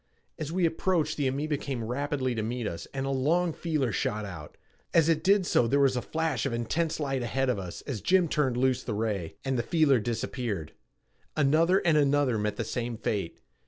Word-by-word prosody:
As 155 -1 -4
we 180 0 +1
approached 165 -1 +1
the 145 -3 0
amoeba 145 +3 -1
came 135 -4 -4
rapidly 130 +2 -1
to 110 - -2
meet 120 +2 -3
us 85 -4 -5
and 135 0 -3
a 135 - -1
long 160 +6 +1
feeler 150 -8 -1
shot 105 +1 -1
out. 80 -6 -9 0.4
As 165 -2 +5
it 160 -1 +2
did 200 -1 +4
so 120 - +3
there 140 +4 +2
was 135 -2 +4
a 125 - 0
flash 160 -4 -1
of 130 - -3
intense 155 +9 -1
light 135 -3 -1
ahead 135 +3 0
of 125 - 0
us 90 -2 -7
as 130 -7 -5
Jim 185 -2 +3
turned 135 -5 0
loose 130 0 +2
the 110 - -4
ray, 105 -6 -2
and 135 -2 0
the - - +3
feeler 150 -4 +3
disappeared. 110 - -3 0.6
Another 160 +6 +3
and 160 -3 +4
another 140 -5 +2
met 105 0 -1
the 115 - -2
same 115 +1 -3
fate. 100 -6 -3
135 Hz, 205 wpm, -28 LUFS, 115-155 Hz, 0.6 s, As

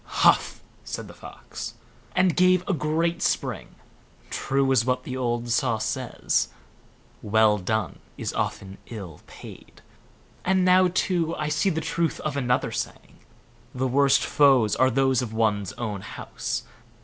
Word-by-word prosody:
"HUF", - - +4 0.2
said - - -6
the - - -11
Fox, - - -9 0.4
and 185 -2 +3
gave 185 0 +4
a 200 - +1
great 165 +2 0
spring; - - -2 0.6
"true 135 0 0
it - - +5
is 120 -3 +4
what 125 +1 0
the 130 - -5
old 120 -2 -2
saw 120 -1 +2
says, - - -1 0.7
'Well 105 0 +3
done 105 -1 -2 0.2
is - - -4
often 95 0 -3
ill 95 -9 -8
paid'; - - -13 0.6
and 185 0 +2
now, 185 0 +6
too, 175 -3 0
I 150 0 -2
see 155 +6 +1
the 160 -3 -1
truth 165 +1 -1
of 150 -2 -3
another 125 -3 0
saying, - - -6 0.6
'The 130 +1 0
worst 140 +1 +3
foes 135 -8 +4
are 130 - +4
those 130 0 +2
of 115 -3 -5
one's 105 -4 +1
own 105 -5 -4
house. 105 - -5
130 Hz, 150 wpm, -25 LUFS, 110-160 Hz, 0.7 s, now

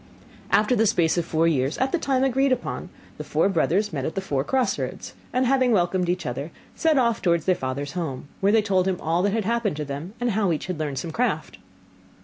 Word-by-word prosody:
After 210 +4 +3
the 225 -1 +3
space 170 -6 +2
of 170 - -2
four 165 0 +1
years, 140 -2 +1
at 260 +1 0
the 345 - +1
time 265 -3 +1
agreed 270 +1 +2
upon, 255 -1 -2 0.3
the - - -3
four - - +1
brothers 195 +2 +1
met 135 -3 -2
at 155 - -3
the - - 0
four 140 -8 -1
cross 260 - 0
roads; - - -5 0.2
and 255 +1 +1
having 255 -1 +3
welcomed 180 -3 +1
each 180 +1 -1
other, 135 +5 -4 0.2
set 320 -3 +2
off 235 -4 +2
towards 170 -3 +1
their 185 - +4
father's 140 -2 -4
home, 155 -7 -4
where 195 +1 +3
they 220 0 +4
told 190 -2 +1
him 185 -2 -1
all 165 +2 0
that 200 +1 +1
had 220 -3 0
happened 230 -5 0
to 150 - -3
them, 145 +9 -6
and 245 -1 0
how 200 -3 +1
each 155 - -2
had 180 -3 -4
learned 145 -3 -3
some 165 +5 -4
craft. 245 +9 -2
185 Hz, 235 wpm, -24 LUFS, 160-235 Hz, 0.3 s, their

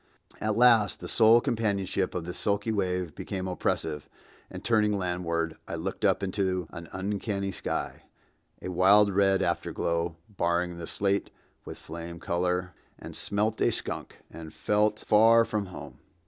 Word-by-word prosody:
At 110 0 -1
last 115 -7 +5
the - - -7
sole 115 +1 +6
companionship 100 -5 -1
of 85 -2 -3
this 90 +1 -6
sulky 100 +2 0
wave 90 -5 -1
became 95 +2 -5
oppressive, 80 -4 -2 0.4
and - - -9
turning 105 -3 +2
landward, 85 -3 -2
I - - -4
looked 95 +6 -5
up 100 -1 +2
into 95 -2 -1
an 85 0 -9
uncanny 100 +1 -2
sky—a 90 - -7
wild 100 +3 +5
red 95 0 +3
afterglow 85 -1 -1
barring 85 -3 -1
the 85 - -6
slate 100 -1 0 0.4
with - - -8
flame 85 +1 -8
color—and 90 +1 -3
smelt 105 +2 0
a - - +4
skunk, - - -5 0.2
and 80 -1 -9
felt 105 +5 +1
far 115 +2 +6
from 105 -3 -2
home. 70 -8 -10
95 Hz, 140 wpm, -28 LUFS, 85-105 Hz, 0.4 s, sole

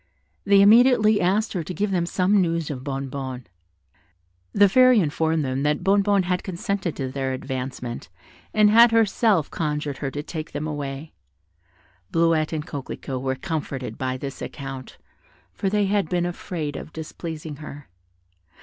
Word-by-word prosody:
They 200 -1 +6
immediately 220 0 +6
asked 205 +5 +1
her 180 - -1
to 175 +3 -6
give 205 0 -1
them 175 -2 0
some 190 +3 +2
news 165 -3 -1
of 130 -3 -6
Bonnebonne. 135 -2 -5 1.1
The 205 0 +5
Fairy 255 +3 +6
informed 160 -2 0
them 130 +1 -2
that 150 +1 0
Bonnebonne 200 0 +3
had 180 0 -1
consented 190 -1 -3
to 130 -2 -4
their 135 -1 -2
advancement, 130 - -5 0.4
and 210 -1 +4
had 230 +1 +7
herself 220 - +2
conjured 150 -3 -2
her 140 - -2
to 145 +2 -5
take 155 0 -6
them 145 - -3
away. 145 0 -5 1.0
Bleuette 165 -2 +2
and 155 -2 -3
Coquelicot 135 -2 -6
were 130 0 -1
comforted 140 - -5
by 130 0 -2
this 135 +1 -7
account, 135 -2 -7 0.6
for 190 - -1
they 205 +1 +1
had 195 -4 0
been 175 -1 0
afraid 170 -4 -4
of - - -7
displeasing 160 -1 -7
her. 145 -1 -10
160 Hz, 150 wpm, -24 LUFS, 140-195 Hz, 1.1 s, had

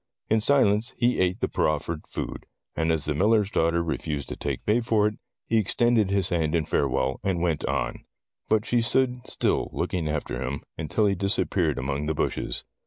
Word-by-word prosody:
In 110 0 +4
silence 115 -3 +3
he 120 0 +2
ate 90 0 +1
the - - +2
proffered 75 +1 -1
food, - - -6 0.3
and 80 +1 +1
as 80 -2 0
the 75 - 0
miller's 105 +6 +2
daughter 85 -1 +2
refused 75 -3 -3
to - - -4
take - - -4
pay 110 +3 +3
for 110 -3 +2
it, 105 0 -1 0.3
he 115 - +1
extended 110 0 +2
his 100 -2 +2
hand 80 -2 0
in 80 -2 +1
farewell, 65 -1 0
and 95 -3 0
went 85 -3 0
on. - - -2 0.5
But 110 -1 +2
she 120 -1 +2
stood 125 +1 +1
still, - - 0
looking 85 -4 -2
after 75 -5 -3
him, 65 +1 -3
until 80 +7 0
he 100 - +3
disappeared 100 +1 0
among 70 +3 -2
the 80 - -1
bushes. - - -1
90 Hz, 185 wpm, -26 LUFS, 75-110 Hz, 0.5 s, In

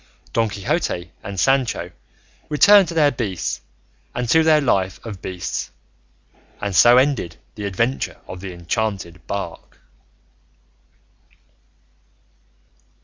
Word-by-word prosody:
Don 115 -1 +2
Quixote 100 - -2
and 100 -1 -6
Sancho 125 -9 +1 0.6
returned 195 +6 +6
to 170 - -6
their 150 -3 +4
beasts, 105 - -3 0.5
and 125 -1 -2
to 160 +5 +5
their 160 -1 +5
life 95 -9 0
of 105 -5 -7
beasts, 90 -1 -4 0.9
and 100 -2 -3
so 120 +8 +7
ended 130 - +1 0.2
the 105 -2 -6
adventure 115 +7 -1
of 90 - -8
the 95 -1 -6
enchanted 90 +1 -3
bark. 100 -4 -6
105 Hz, 105 wpm, -21 LUFS, 95-135 Hz, 0.9 s, so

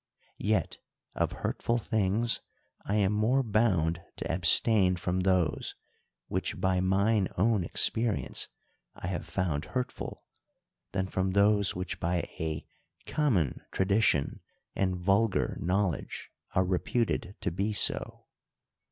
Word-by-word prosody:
Yet, 105 -5 0 0.3
of - - -1
hurtful 120 - 0
things, 110 +1 +1 0.5
I 100 - -1
am 100 -1 +2
more 115 +6 +2
bound 95 -7 +1
to - - -3
abstain 90 +3 +4
from 90 +1 -2
those, 90 -4 +1 0.5
which - - -3
by 95 -1 +2
mine 100 +2 +2
own 105 0 +2
experience 110 +5 0 0.5
I - - -8
have 90 0 -3
found 85 -6 -1
hurtful, 125 -1 -4 0.7
than 95 -1 -1
from 95 0 -1
those 100 0 +3
which 90 0 -4
by 85 +1 -1
a 80 -1 -3 0.4
common 105 - 0
tradition 95 -7 +2 0.4
and 95 -1 0
vulgar 100 +4 +1
knowledge 95 -1 -2 0.2
are 90 - +3
reputed 95 +2 -1
to 90 - -1
be 100 +5 -1
so. 105 - +2
95 Hz, 115 wpm, -29 LUFS, 90-105 Hz, 0.7 s, abstain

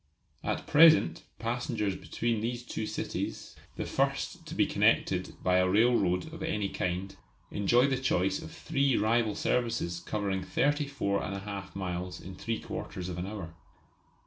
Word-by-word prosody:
At - - -2
present 160 +1 +6
passengers 115 -4 -1
between 105 +6 -2
these 120 +2 -2
two 110 -3 -4
cities - - -4 0.2
the - - -3
first - - -1
to - - -6
be - - +4
connected - - +2
by 90 0 +4
a 90 0 +3
railroad 110 - +3
of 165 - -8
any 105 -11 -1
kind 95 +2 -2 0.4
enjoy 120 +5 +4
the 135 -2 +1
choice 95 -6 +1
of - - -8
three 135 -2 +1
rival 110 0 +2
services 115 -8 0
covering 95 +1 -2
34 140 -3 0
1/2 100 0 -5
miles 90 -1 -4
in 95 - -9
three 115 +4 -3
quarters 90 -1 -5
of 90 -1 -4
an 90 - -3
hour. 100 -6 -6
105 Hz, 145 wpm, -30 LUFS, 95-120 Hz, 0.4 s, present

